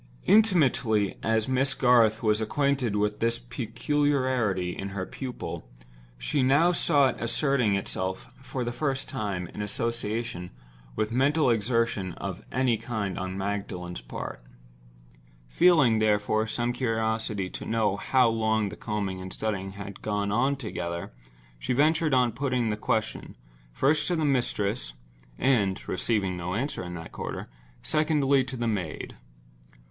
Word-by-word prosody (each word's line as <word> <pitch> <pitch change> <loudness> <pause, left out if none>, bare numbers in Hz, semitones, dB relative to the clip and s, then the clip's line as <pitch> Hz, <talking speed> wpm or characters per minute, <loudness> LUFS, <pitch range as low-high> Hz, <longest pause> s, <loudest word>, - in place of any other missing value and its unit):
Intimately 130 - +3
as 110 -1 +1
Miss 135 +1 +1
Garth 120 -4 +4
was 105 0 +2
acquainted 135 -1 0
with 105 0 0
this 115 +1 +1
peculiarity 125 - 0
in 100 - -5
her 95 - -2
pupil, 130 +3 -6 0.5
she - - 0
now 140 +7 +4
saw 145 -5 +3
it - - -5
asserting 125 -3 +2
itself 95 -1 -3 0.2
for 130 -1 -4
the 120 - -2
first 135 +1 -2
time, 100 -4 -3
in - - -7
association 115 -2 -3 0.5
with 110 0 -1
mental 135 +2 +3
exertion 115 -4 0
of - - -6
any 125 -2 +2
kind 105 -5 -3
on 95 0 -4
Magdalen's 95 - -4
part. - - -7 1.0
Feeling, 135 - +4
therefore, 110 0 +2
some 120 +2 -1
curiosity 110 -4 -1
to - - -6
know 110 -3 +1
how 130 +4 +3
long 110 -2 +1
the 100 - -8
combing 100 -4 -3
and 95 - -6
the - - -6
studying 95 -3 -3
had 100 0 -8
gone 105 -1 -1
on 130 +6 +2
together, 85 - -5 0.5
she - - -1
ventured 155 +2 +3
on 125 -2 +3
putting 125 -3 0
the 105 - 0
question, 110 +1 -2 0.4
first 140 - +2
to 180 - +1
the 160 -2 0
mistress; 120 - 0 0.4
and 105 -8 +1
(receiving 95 -1 0
no 90 +1 -3
answer 130 -2 -2
in 90 0 -6
that 80 -1 -8
quarter) - - -5 0.4
secondly 150 -3 +2
to 130 0 -6
the 120 0 -1
maid. 95 -8 -3
115 Hz, 140 wpm, -27 LUFS, 100-130 Hz, 1.0 s, Garth